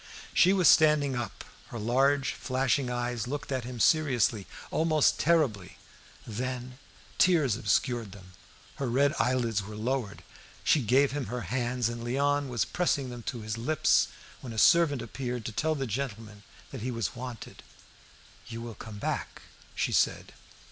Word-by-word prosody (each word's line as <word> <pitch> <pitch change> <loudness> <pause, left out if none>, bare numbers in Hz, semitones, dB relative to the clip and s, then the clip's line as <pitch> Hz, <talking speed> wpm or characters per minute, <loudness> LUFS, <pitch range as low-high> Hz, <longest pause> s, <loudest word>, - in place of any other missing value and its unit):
She 180 - +5
was 190 -3 +4
standing 150 -3 +5
up, 115 -6 -5 0.2
her 120 - -7
large 135 +5 +2
flashing 130 0 0
eyes 120 -1 -2
looked 145 +2 -5
at 130 -3 -2
him 125 -1 -7
seriously, 125 - +2 0.2
almost 155 -2 +2
terribly. 140 - +1 0.5
Then 125 +3 -5 0.4
tears 155 - +4
obscured 115 0 0
them, 95 -2 -14 0.4
her 135 -3 -2
red 140 +4 +3
eyelids 120 -4 +1
were 105 +2 -9
lowered, 115 -1 -3 0.4
she 150 - +3
gave 130 +4 +3
him 145 -1 -3
her 125 0 -4
hands, 120 +3 -1
and 120 0 -5
Léon 140 +3 +1
was 120 -3 0
pressing 145 -7 -1
them 120 -1 -7
to 120 - -6
his 110 +1 -4
lips 155 +7 +3 0.3
when 120 -3 -8
a - - -8
servant 145 -1 +4
appeared 125 -4 -5
to - - -3
tell 155 +8 0
the 135 -2 -2
gentleman 110 -3 -5 0.3
that 135 - -7
he 125 - -3
was 115 -6 -3
wanted. 125 -2 -8 0.9
"You 115 -1 -6
will 120 -1 -7
come 110 -1 -9
back?" - - -4 0.3
she - - 0
said. - - +1
125 Hz, 155 wpm, -29 LUFS, 115-140 Hz, 0.9 s, She